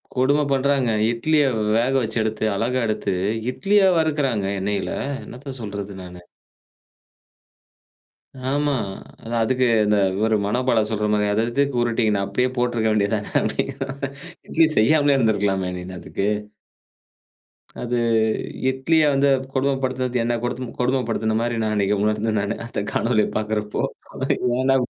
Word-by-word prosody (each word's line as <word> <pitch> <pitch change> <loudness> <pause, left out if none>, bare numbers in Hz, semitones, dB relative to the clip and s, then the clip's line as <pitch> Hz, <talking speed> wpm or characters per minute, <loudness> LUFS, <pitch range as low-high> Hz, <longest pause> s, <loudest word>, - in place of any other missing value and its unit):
கொடும 135 +3 +3
பண்றான்ங்க. 135 -2 +2 0.2
இட்லிய 150 +6 +2 0.3
வேக 120 +3 +1
வச்சு 115 +1 -3
எடுத்து, 110 0 -2
அழகா 120 +5 0
எடுத்து, 110 -2 -1 0.4
இட்லியா 200 +7 +3
வறுக்கிறான்ங்க, 140 -11 0
எண்ணெயில. 100 +1 -2 0.3
என்னத்த 130 +1 -8
சொல்றது 100 -2 -6
நானு! 90 0 -11 2.3
ஆமா. 145 +1 +1 0.5
அந்த 115 - -6
அதுக்கு 130 +3 +1 0.2
இந்த 105 0 +3 0.2
இவரு 110 +1 +2
மனோபால 120 +1 +1
சொல்ற 105 -1 -1
மாரி 105 0 +2
அத 105 +2 +1
எதுக்கு 140 +2 0
உருட்டி 120 0 +1
நா 100 - 0
அப்படியே 125 +6 0
போட்டிருக்க 120 -2 +1
வேண்டியது 100 -1 +1
தானே! - - -7
அப்டிங்குற - - -2
மாரி 140 -1 -3 0.4
இட்லி 165 -1 +4
செய்யாமலே 145 +5 +4
இருந்திருக்கலாமே! 100 -6 +1
நீனு 90 +1 -8
அதுக்கு. 100 +3 -3 1.5
அது 120 0 -2 0.7
இட்லிய 145 +5 +2
வந்து 140 +1 +3 0.3
கொடுமைப்படுத்தினது, 130 -2 0
என்னை 120 +1 0
படுதுன்னது 120 0 -4
கொடுமைப்படுத்தின 120 -3 0
மாரி, 120 0 -1
நான் 110 0 0
அன்னைக்கு 100 0 +1
உணர்ந்தேன் 110 0 0
நானு, 100 +2 -2
அந்த 115 - -3
காணொளிய 115 -2 +2
பாக்கிறப்போ, 105 -1 -2 0.8
ஏன்டா 135 +1 +3
120 Hz, 130 wpm, -22 LUFS, 105-135 Hz, 2.3 s, இட்லி